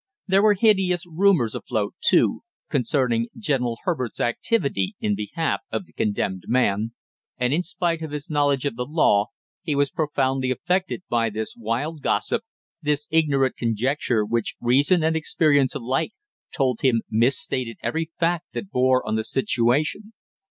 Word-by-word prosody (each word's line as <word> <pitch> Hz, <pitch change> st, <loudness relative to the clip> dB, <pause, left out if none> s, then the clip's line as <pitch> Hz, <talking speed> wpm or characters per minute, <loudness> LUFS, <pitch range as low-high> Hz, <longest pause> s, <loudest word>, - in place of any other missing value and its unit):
There 195 Hz, 0 st, +3 dB
were 210 Hz, 0 st, +5 dB
hideous 190 Hz, -4 st, +2 dB
rumors 170 Hz, -, +2 dB
afloat, 105 Hz, -2 st, -2 dB
too, -, -, +3 dB, 0.3 s
concerning 125 Hz, -4 st, +1 dB
General 130 Hz, -, 0 dB
Herbert's 130 Hz, -, -2 dB
activity 120 Hz, -, 0 dB
in 105 Hz, -, 0 dB
behalf 105 Hz, +11 st, -2 dB
of 195 Hz, -, -3 dB
the -, -, -25 dB
condemned 100 Hz, -3 st, -2 dB
man, 115 Hz, -2 st, +1 dB, 0.4 s
and 125 Hz, +2 st, +1 dB
in 165 Hz, -, +2 dB
spite 170 Hz, -1 st, -2 dB
of 160 Hz, -, -4 dB
his 145 Hz, 0 st, -5 dB
knowledge 145 Hz, -3 st, +1 dB
of 140 Hz, -, -1 dB
the 125 Hz, +1 st, -3 dB
law, 125 Hz, -9 st, +3 dB, 0.3 s
he 155 Hz, -5 st, -2 dB
was 140 Hz, -1 st, +1 dB
profoundly 135 Hz, -4 st, 0 dB
affected 180 Hz, +8 st, -1 dB
by 115 Hz, -1 st, +1 dB
this 110 Hz, +1 st, -4 dB
wild 125 Hz, +8 st, -3 dB
gossip, 230 Hz, -, 0 dB, 0.4 s
this 150 Hz, -1 st, 0 dB
ignorant 145 Hz, -5 st, +2 dB
conjecture, 120 Hz, 0 st, 0 dB
which 115 Hz, +1 st, -1 dB
reason 140 Hz, +8 st, +3 dB
and 160 Hz, 0 st, +2 dB
experience 150 Hz, -3 st, +2 dB
alike 135 Hz, -, -1 dB, 0.4 s
told 130 Hz, -4 st, 0 dB
him 120 Hz, -4 st, +2 dB
misstated 120 Hz, +1 st, 0 dB
every 160 Hz, 0 st, -1 dB
fact 170 Hz, 0 st, 0 dB
that 195 Hz, -, -6 dB
bore 130 Hz, -1 st, +2 dB
on 110 Hz, -, -1 dB
the 110 Hz, 0 st, 0 dB
situation. 135 Hz, -, 0 dB
135 Hz, 150 wpm, -23 LUFS, 120-160 Hz, 0.4 s, were